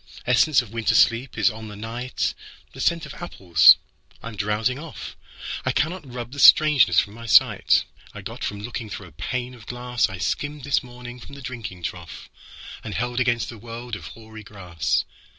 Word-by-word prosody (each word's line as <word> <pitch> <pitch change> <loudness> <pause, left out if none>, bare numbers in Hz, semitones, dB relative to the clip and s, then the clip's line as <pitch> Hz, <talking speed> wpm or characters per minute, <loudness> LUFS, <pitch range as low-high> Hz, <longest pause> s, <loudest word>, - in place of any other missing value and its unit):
Essence 125 +3 +4
of 115 -2 -14
winter 115 0 +1
sleep 120 +3 +3
is - - +3
on 110 0 -9
the 105 - -9
night, 115 +4 -3 0.4
The - - -8
scent 170 -1 +1
of - - -9
apples: 90 - +6 0.5
I 115 - -5
am 110 - -10
drowsing 105 +6 -1
off.I 160 -1 -7
cannot 155 -3 -2
rub 120 -1 -6
the 140 - -8
strangeness 150 -2 +7
from 100 - -2
my 115 +1 -10
sightI - - +5 0.4
got - - -7
from 100 0 -4
looking 115 0 -6
through - - -7
a - - -14
pane 125 0 -4
of 115 -4 -15
glassI 125 -5 -1
skimmed 145 - -3
this 140 +1 +1
morning 125 -1 -10
from 140 - -12
the - - -10
drinking 110 -8 -7
troughAnd 90 +4 -9
held 120 +2 -2
against 120 -2 +1
the 115 - -9
world 120 +1 -7
of - - -9
hoary 110 -1 -12
grass. 90 -6 -2
120 Hz, 175 wpm, -23 LUFS, 110-125 Hz, 0.5 s, strangeness